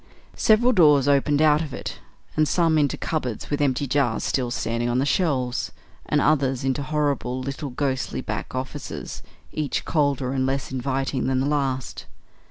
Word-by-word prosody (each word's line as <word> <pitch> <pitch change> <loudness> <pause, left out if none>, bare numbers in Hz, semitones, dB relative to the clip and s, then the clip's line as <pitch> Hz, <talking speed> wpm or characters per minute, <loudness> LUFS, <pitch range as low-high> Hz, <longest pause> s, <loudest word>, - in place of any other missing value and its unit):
Several 225 +3 +4
doors 150 - +5
opened 145 +1 +3
out 150 0 +5
of 155 -4 -5
it - - -6 0.4
some 160 0 +2
into 145 -2 +1
cupboards 130 -8 -3
with 145 - 0
empty 140 0 +1
jars 135 -4 +1
still 125 -3 0
standing 120 0 -1
on 120 - +1
the 135 - +2
shelves, 135 -7 0 0.4
and 150 - +2
others 135 -3 +2
into 135 +1 0
horrible 145 -4 -1
little 140 +3 -4
ghostly 130 0 -2
back - - -5
offices, 130 +3 -5 0.3
each 150 -3 -2
colder 140 -4 +1
and 130 -1 0
less 135 0 -2
inviting 135 0 -1
than 130 -1 +1
the 135 - 0
last. 135 -3 -2
140 Hz, 160 wpm, -24 LUFS, 130-150 Hz, 0.4 s, doors